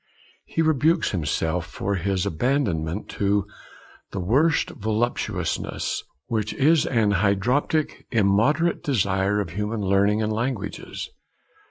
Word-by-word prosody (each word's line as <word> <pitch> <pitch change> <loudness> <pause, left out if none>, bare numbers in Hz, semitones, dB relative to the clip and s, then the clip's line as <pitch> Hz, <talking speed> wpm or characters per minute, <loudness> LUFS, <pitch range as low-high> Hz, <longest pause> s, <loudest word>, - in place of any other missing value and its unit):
He 165 - 0
rebukes 160 +2 +2
himself 80 0 -1
for 100 +1 -3
his 95 0 0
abandonment 95 - -1
to 100 0 +1 0.6
'the 100 - -5
worst 135 - +2
voluptuousness, 110 -4 -2 0.2
which 110 -2 -2
is 155 +3 +4
an 115 -5 +2
hydroptic, 105 - +1
immoderate 115 +10 +2
desire 100 -5 +1
of 95 -5 -3
human 105 +4 -2
learning 100 +2 +2
and 110 0 0
languages.' 115 -1 -4
105 Hz, 110 wpm, -24 LUFS, 95-130 Hz, 0.6 s, is